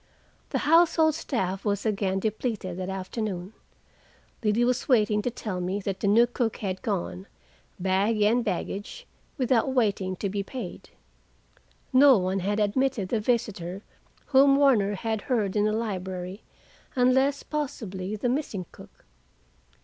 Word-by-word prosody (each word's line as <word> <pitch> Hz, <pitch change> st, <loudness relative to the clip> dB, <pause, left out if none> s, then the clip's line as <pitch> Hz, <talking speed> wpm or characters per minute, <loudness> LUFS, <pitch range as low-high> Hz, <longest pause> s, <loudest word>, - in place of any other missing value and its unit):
The -, -, -1 dB
household 320 Hz, 0 st, +5 dB
staff 195 Hz, -, -2 dB
was 205 Hz, 0 st, -1 dB
again 200 Hz, -3 st, 0 dB
depleted 215 Hz, -2 st, -2 dB
that 185 Hz, 0 st, -4 dB
afternoon. 190 Hz, 0 st, -4 dB, 0.9 s
Liddy 215 Hz, +3 st, +2 dB
was 250 Hz, +4 st, -1 dB
waiting 210 Hz, -4 st, +3 dB
to 245 Hz, -, -1 dB
tell 210 Hz, -6 st, -5 dB
me 185 Hz, +3 st, -2 dB
that 195 Hz, -1 st, -3 dB
the 200 Hz, -, -1 dB
new 225 Hz, +4 st, +6 dB
cook 240 Hz, -2 st, -2 dB
had 190 Hz, -3 st, -4 dB
gone, 90 Hz, +2 st, -3 dB, 0.5 s
bag 195 Hz, +4 st, +1 dB
and 235 Hz, +4 st, +3 dB
baggage, 195 Hz, +2 st, -4 dB, 0.3 s
without 255 Hz, -1 st, +2 dB
waiting 200 Hz, -6 st, +1 dB
to 200 Hz, -, -3 dB
be 200 Hz, +1 st, -2 dB
paid. 250 Hz, +6 st, -7 dB, 1.0 s
No 265 Hz, -1 st, +7 dB
one 185 Hz, +1 st, 0 dB
had 205 Hz, +3 st, -1 dB
admitted 215 Hz, -1 st, 0 dB
the 230 Hz, -, +1 dB
visitor 210 Hz, -5 st, -2 dB, 0.4 s
whom 275 Hz, 0 st, +5 dB
Warner 235 Hz, -8 st, +3 dB
had 220 Hz, +2 st, -2 dB
heard 215 Hz, -6 st, -1 dB
in 210 Hz, 0 st, +3 dB
the 215 Hz, -, +2 dB
library, 190 Hz, -3 st, -4 dB, 0.5 s
unless, 265 Hz, +3 st, +3 dB
possibly, 215 Hz, -10 st, -4 dB
the 215 Hz, +4 st, -2 dB
missing 240 Hz, -8 st, -2 dB
cook. -, -, -16 dB
210 Hz, 140 wpm, -26 LUFS, 190-245 Hz, 1.0 s, No